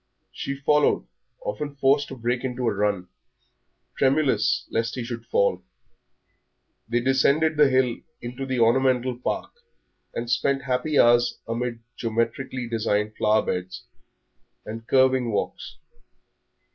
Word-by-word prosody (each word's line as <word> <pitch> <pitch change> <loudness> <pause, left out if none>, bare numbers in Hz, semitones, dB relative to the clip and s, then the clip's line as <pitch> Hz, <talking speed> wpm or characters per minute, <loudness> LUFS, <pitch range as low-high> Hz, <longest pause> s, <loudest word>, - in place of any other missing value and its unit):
She 140 - -4
followed, 150 +1 +2 0.4
often 150 - -4
forced 140 +1 +3
to 135 - -8
break 120 +1 -1
into 125 -1 -2
a - - +2
run, 100 -2 -1 0.9
tremulous 140 +1 +2
lest 115 +1 -1
he 125 - -3
should 115 -1 -6
fall. 95 -2 +1 1.3
They 120 +1 +1
descended 140 +5 +3
the 150 -2 +5
hill 130 -2 +2 0.2
into 125 +3 -6
the 130 -2 -1
ornamental 125 +1 +3
park, - - -3 0.6
and 120 - -3
spent 135 +3 +1
happy 140 +3 0
hours 120 0 +4
amid 115 0 -3 0.2
geometrically 120 +2 -2
designed 110 -2 -1
flower 110 0 +2
beds 90 0 -4 0.8
and 115 +1 -7
curving 130 -2 +3
walks. 105 - -3
125 Hz, 120 wpm, -25 LUFS, 115-135 Hz, 1.3 s, the